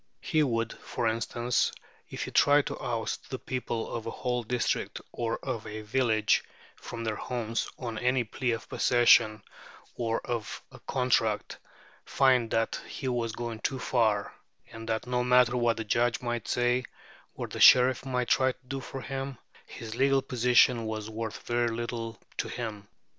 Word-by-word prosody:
He 155 - +1
would, 115 -5 0
for 115 - -2
instance, 120 +2 0 0.4
if - - -4
he - - -6
tried 145 0 +5
to - - -5
oust 115 -2 -3
the 130 - -3
people 125 -3 -4
of 115 -1 -4
a - - -1
whole 125 +1 -2
district 120 +1 -1
or 115 -1 -2
of 110 -1 -3
a 110 0 -6
village 110 -1 +2 0.3
from 115 -1 -7
their 110 -2 -2
homes 115 -2 -2
on 115 -4 -4
any 125 0 +2
plea 125 +3 -3
of 115 - -5
possession, 115 -3 +4 0.5
or 115 -2 -1
of 115 -3 -4
a - - -13
contract, 125 -5 0 0.4
find 130 -4 +3
that 115 0 0
he 135 - -5
was 120 -2 -1
going 115 -1 -5
too 135 - -1
far, 110 -5 +1 0.4
and 115 0 -8
that 110 +1 -1
no 125 0 0
matter 125 0 +4
what 120 -2 +2
the 115 - -2
judges 120 +4 +1
might 120 -2 -3
say, 125 +1 +1 0.5
or - - -4
the - - -7
sheriff 130 0 +7
might 125 -2 -1
try 130 -1 +3
to 125 - -31
do 135 +1 -3
for 135 +1 -7
him, 135 -1 -5 0.3
his 110 -1 -8
legal 135 +2 +3
position 125 -2 +3
was 110 0 -4
worth 110 0 -5
very 120 0 +1
little 115 -1 -4 0.2
to - - -1
him. 110 -4 -5
120 Hz, 170 wpm, -29 LUFS, 115-125 Hz, 0.5 s, sheriff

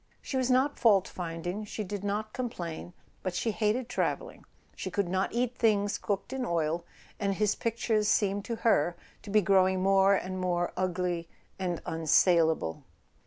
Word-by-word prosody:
She - - -6
was 260 -1 +1
not 260 +3 +2
fault 200 -6 +4
finding, 175 +3 -4
she 210 +1 -5
did 205 0 -5
not 210 +2 -2
complain, 175 -9 -5 0.3
but 185 -2 -3
she 225 +5 0
hated 220 +3 0
travelling, - - -2 0.3
she - - -4
could 200 -3 -1
not 185 +2 0
eat 245 +1 -1
things 205 -2 +2
cooked 200 +5 -3
in 265 -1 -2
oil, 170 -4 0 0.4
and 200 -1 0
his 210 0 +2
pictures 225 -2 0
seemed 205 -1 +2
to 235 - -3
her 175 -6 +3 0.3
to 205 - -11
be 210 0 +4
grow¬ 190 0 +4
ing 185 0 -1
more 195 0 +5
and 185 0 -3
more 175 -1 0
ugly 180 -2 -1 0.3
and 180 -3 -2
unsalable. 160 - +2
195 Hz, 165 wpm, -29 LUFS, 175-215 Hz, 0.4 s, more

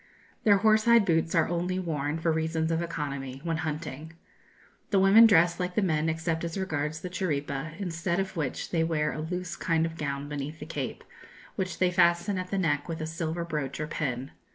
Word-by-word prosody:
Their 205 -2 +6
horse 215 +1 +4
hide 235 -3 +6
boots 165 -2 +1
are 165 - +4
only 175 +2 -1
worn, 155 -4 -2
for 165 0 +1
reasons 160 0 0
of 165 0 +1
economy, 140 -5 -4
when 165 -1 -1
hunting. 155 -1 -5 0.8
The 200 - +2
women 195 +4 +8
dress 175 -4 +4
like 180 0 -2
the 215 - +2
men 160 -3 +1
except 160 0 -1
as 170 +2 -3
regards 155 -4 -2
the 180 - -5
chiripa, 155 -2 -3
instead 175 -1 -1
of 190 0 -3
which 150 -6 -3
they 165 -2 +2
wear 155 -2 0
a 155 - -4
loose 180 +1 -4
kind 165 -1 +1
of 165 0 -5
gown 140 -2 -3
beneath 145 +1 -5
the 150 - -7
cape, 145 -5 -5 0.5
which 185 -1 -3
they 185 -1 +2
fasten 175 +2 +3
at 185 0 -5
the 195 - -1
neck 150 -4 0
with 165 - -3
a 155 - -3
silver 165 +1 -3
brooch 150 -5 -3
or 155 - -1
pin. 135 -4 -3
165 Hz, 200 wpm, -28 LUFS, 150-180 Hz, 0.8 s, women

